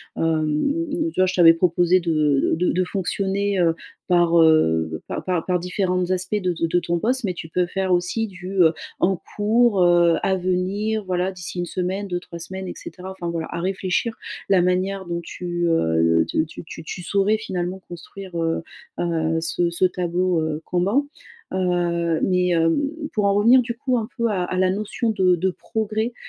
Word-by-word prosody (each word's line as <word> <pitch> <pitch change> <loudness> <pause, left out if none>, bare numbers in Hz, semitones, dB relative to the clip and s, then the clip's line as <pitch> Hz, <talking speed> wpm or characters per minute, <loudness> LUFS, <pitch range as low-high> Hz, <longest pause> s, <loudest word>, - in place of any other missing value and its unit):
Hem, 160 -1 +1
m 280 - 0 0.2
m 330 - -2
tu - - -6
vois, - - +5
je 185 - -1
t'avais 165 -2 +7
proposé 175 +1 +3
de 155 -5 +1
d 180 - -1
de - - +3
de 185 - +1
fonctionner, 195 +1 -1
heu, 170 -2 +3 0.4
par, 170 -1 +4
heu, 80 - +3
par - - -4
par 180 -3 -1
par 180 -1 +1
différentes 180 0 -1
aspects 185 +2 -1
de 180 -1 0
de 165 0 -1
de 175 +1 +2
ton 170 0 -1
poste, 255 +6 0
mais 185 - -1
tu 165 - -8
peux 180 +2 +1
faire 190 0 -2
aussi 180 +6 0
du, 185 -1 -9
heu, 160 - +4 0.3
en 185 0 +2 0.2
cours, 215 -1 +3
heu, 175 -1 +5
à 190 - +2
venir, 190 +4 -1
voilà, 185 +1 -1
d'ici 180 -1 -6
1 175 - -1
semaine, 185 +3 -3
2-3 175 -2 -5
semaines 190 +2 -6
et - - -5
cetera. 185 +1 -8
Enfin 180 -3 -5
voilà, 165 -1 -3
à - - -3
réfléchir 190 +4 -1 0.3
la 190 -2 +5
manière 185 +2 0
dont 170 0 -3
tu, - - -9 0.3
heu 80 - +3
heu, - - +1
de - - 0
te - - -6
tu 160 - -10
tu 160 - -9
tu 175 +3 -6
saurais 200 +4 +2
finalement 185 -3 -4
construire, 180 +2 -9
heu 165 0 -1 0.4
heu, 165 -2 0
ce 170 +1 0
ce 170 +2 -2
tableau, 180 -1 0
heu, 155 0 -2
Kanban. 200 +11 +1 0.5
Heu, 170 -3 0
mais, 180 -1 +2
hem, 165 -1 +2 0.4
pour 210 - 0
en 200 - +3
revenir 230 +6 +6
du 235 0 -4
coup 255 -2 0
un 220 -2 -2
peu 235 0 +1
à 185 -4 0
à 185 - -3
la 185 0 +3
notion 215 +3 -2
de 185 -4 +3
de 185 +3 0
progrès, 220 +4 -3
180 Hz, 200 wpm, -22 LUFS, 170-195 Hz, 0.5 s, t'avais